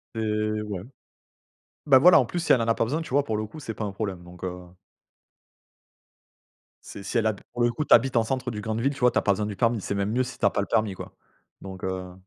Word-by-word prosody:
C'est 110 -1 -1
ouais. 105 -4 -5 1.1
Bah, 135 -3 +7
voilà 175 +4 +7
en 130 - +3
plus 175 +10 -4
si 170 - +3
elle 120 - +4
en 115 - -2
a 115 - +4
pas - - +1
besoin, 155 +8 -2
tu - - -10
vois? 140 +1 +2
Pour 110 - -2
le 110 - -2
coup 155 +8 -11
c'est 115 -5 -6
pas 105 - -4
un 100 - -4
problème, 95 -3 -4
donc 90 +1 -11
heu 90 - -1 2.4
C'est 100 - -9
si 100 +5 -3
elle 110 - +1
a 110 - +2
pour 120 +4 -5
le 120 - +3
coup 150 - -2
tu - - +7
habites 125 +2 +1
en 115 - +4
centre 125 +1 -2
du 105 - -5
grande 110 +1 -3
ville, 140 +4 +1
tu - - -11
vois? 125 0 +5
Tu - - -2
as - - +4
besoin 105 +1 0
du 105 - -5
permis, 115 +1 +1
c'est 100 - -3
même 100 +1 -1
mieux 125 +3 +1
si 125 0 -8
tu - - -1
as - - +4
pas 100 - 0
le 100 - -4
permis 110 -3 +1
quoi, - - -10 0.4
donc 95 -1 -10
heu 95 -1 -4
110 Hz, 275 wpm, -25 LUFS, 100-125 Hz, 2.4 s, Bah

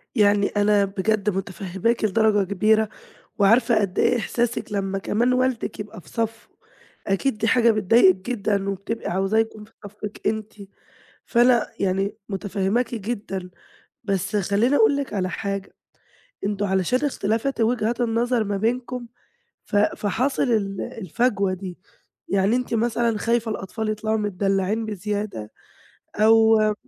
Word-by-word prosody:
يعني 205 -1 +4
أنا 205 -1 +2
بجد 205 +2 0
متفهماكِ 195 +3 -2
لدرجة 215 -1 +2
كبيرة، 215 +2 +3 0.5
وعارفة 225 +4 +4
قد 195 -3 -1
إيه 245 - +3
إحساسِك 235 -1 -2
لمّا 195 -1 -1
كمان 235 +5 +1
والدِك 255 -1 -1
يبقى 205 -3 -8
في 155 - -18
صفّه، 225 0 -3 0.6
أكيد 210 +4 0
دي 225 - 0
حاجة 235 -1 +4
بتضايقِك 210 -2 +5 0.2
جدًا 200 -3 -1
وبتبقي 200 +4 -4
عاوزاه 195 +4 0
يكون 220 -1 -2
في 225 - -25
صفِّك 210 +1 -8
أنتِ، 220 -1 -2 0.7
فأنا 240 -1 +4
يعني 195 +1 0
متفهماكِ 200 +4 -1
جدًا، 200 -4 -4 0.6
بس 200 0 -1
خلّيني 205 +7 +2
أقول 360 -8 +4
لِك 280 -6 -3
على 185 -2 0
حاجة 195 0 -4 0.7
أنتم 205 0 -1
علشان 190 +6 +1
اختلافات 230 0 -1
وجهات 230 +1 +1
النظر 235 0 +1
ما 200 -1 -2
بينكم 240 +3 -2 0.6
ف - - -5
فحصل 215 +5 +1
ال 200 -6 0
الفجوة 200 -1 -1
دي 185 -1 -7 0.5
يعني 195 +3 +2
أنتِ 250 -1 -2
مثلًا 230 0 +1
خايفة 230 +1 0
الأطفال 215 +2 -4
يطلعوا 215 +1 -1
متدلّعين 200 +1 0
بزيادة 205 - -4 0.6
أو 220 +1 +5
م 215 0 +2
215 Hz, 130 wpm, -23 LUFS, 195-230 Hz, 0.7 s, بتضايقِك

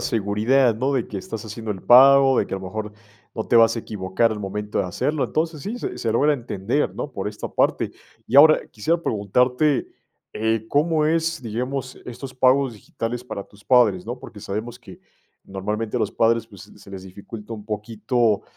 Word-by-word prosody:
seguridad, 115 +3 +2
¿no? 130 +5 0
de 125 -4 -1
que 100 - -5
estás 110 +3 -7
haciendo 110 0 -6
el 95 - -10
pago, 135 +1 +7
de - - +1
que - - -4
a 95 - -3
lo 95 - -9
mejor, 105 +2 -5 0.4
no 110 - -3
te 120 - +2
vas 115 0 +6
a - - -1
equivocar 105 +2 -1
al 105 - -5
momento 105 +2 -4
de - - +1
hacerlo. 140 - -1
Entonces, 155 -2 -2
sí, 235 +4 -4
se - - -5
se 115 -2 -1
logra 145 +6 +3
entender, 120 0 -2
¿no?, 145 - -5
por 95 -3 -4
esta 105 - -6
parte. - - 0 0.4
Y 125 - -6
ahora 155 +2 +8
quisiera 165 +11 0
preguntarte, 125 +7 +1 0.5
eh, 110 0 -1
¿cómo 155 +1 +2
es, 165 0 0
digamos, 125 +4 -4
estos 125 +2 -8
pagos 130 0 +3
digitales 115 +3 -5
para 100 -5 -6
tus 100 0 -21
padres, 115 -8 +4
no?, 120 +2 -5
porque 105 - -12
sabemos 110 +5 -5
que, 120 - -13 0.5
normalmente, 105 +4 -4
a - - 0
los 110 -1 0
padres, 115 0 +2
pues, - - -13
se 100 - -16
les 95 -1 -8
dificulta 105 +4 -10
un 105 -2 -8
poquito, 110 +1 -1
115 Hz, 195 wpm, -22 LUFS, 105-130 Hz, 0.5 s, ahora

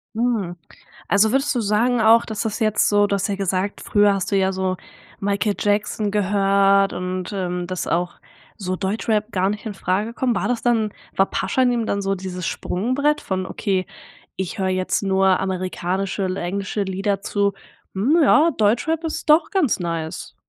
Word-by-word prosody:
Mhm, 220 -7 -1 0.5
also 210 +2 +3
würdest 275 +1 +1
du 240 - 0
sagen 225 +4 +1
auch, 225 +1 +6
dass 215 -2 -5
das 220 +1 -3
jetzt 215 -1 +2
so 205 0 +4
du 200 - -1
hast 200 +1 -1
ja 200 - -1
gesagt 195 +1 -2
früher 205 -1 +3
hast 195 +1 -3
du 200 - +3
ja 190 0 +2
so 185 -1 -1 0.4
Michael 200 0 0
Jackson 205 0 0
gehört 195 -1 +3
und, 185 +1 -4
ähm, 180 -2 -2
dass 185 -1 -4
auch 175 +1 -1 0.4
so 185 -3 -3
Deutschrap 210 +3 -1
gar 190 +1 +1
nicht 210 +2 -6
infrage 205 +2 -2
kommt, 245 -1 0
war - - -1
das 245 -2 -1
dann 225 -3 +1 0.2
war 195 - +3
Pashanim 240 +5 0
dann 200 - -1
so 195 0 0
dieses 180 -2 -5
Sprungbrett 280 +10 0
von 185 -1 -3
okay: 190 -3 -1 0.5
„Ich 190 +3 -4
höre 190 -1 0
jetzt 185 +1 0
nur 190 -1 +3
amerikanische 190 +1 -2
L 185 0 -2
englische 200 +3 -2
Lieder“ 195 +1 -1
zu: 200 0 0 0.4
„Hm, 240 - +2
ja, 300 +3 +5
Deutschrap 250 +10 +1
ist 320 0 -4
doch 310 +5 +5
ganz 370 - +1
nice“? 165 -2 -4
200 Hz, 175 wpm, -21 LUFS, 190-220 Hz, 0.5 s, auch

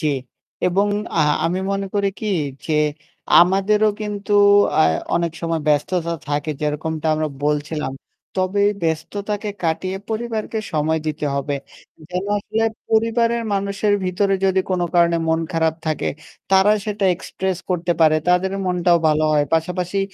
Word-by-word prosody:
জি 155 - -1 0.6
এবং 190 +3 +2 0.3
আ - - +5 0.2
আমি 175 +3 0
মনে 195 0 -2
করি 200 -1 +2
কি 220 - -5 0.4
যে 160 - -1 0.7
আমাদেরও 195 +4 +3
কিন্তু 205 -1 -4 0.5
আ - - +6 0.3
অনেক 170 -1 0
সময় 165 -1 -1
ব্যস্ততা 170 +3 +1 0.2
থাকে 145 +1 -1
যেরকমটা 155 +1 -2
আমরা 155 0 -1 0.2
বলছিলাম। 150 -1 -1 0.5
তবে 185 +2 +1 0.2
ব্যস্ততাকে 200 +6 -2
কাটিয়ে 180 +3 -1
পরিবারকে 220 -1 -3
সময় 155 +1 +1
দিতে 150 -1 -2
হবে, 140 +1 -1 0.6
যেন 180 +1 -2
আসলে 220 +2 -1 0.3
পরিবারের 230 +1 +2
মানুষের 200 +1 0
ভিতরে 195 +2 +1
যদি 190 0 +3
কোনো 180 -1 +1
কারণে 170 -1 +4
মন 160 0 +2
খারাপ 160 -1 +1
থাকে, 155 -2 -1 0.4
তারা 195 +2 +5
সেটা 210 -1 -2
এক্সপ্রেস 190 0 -4
করতে 175 -1 +1
পারে, 155 -1 +5
তাদের 180 +2 +2
মনটাও 175 -1 +3
ভালো 155 0 +2
হয়। 150 -1 +3
পাশাপাশি 180 +3 -1
180 Hz, 135 wpm, -21 LUFS, 160-200 Hz, 0.7 s, আ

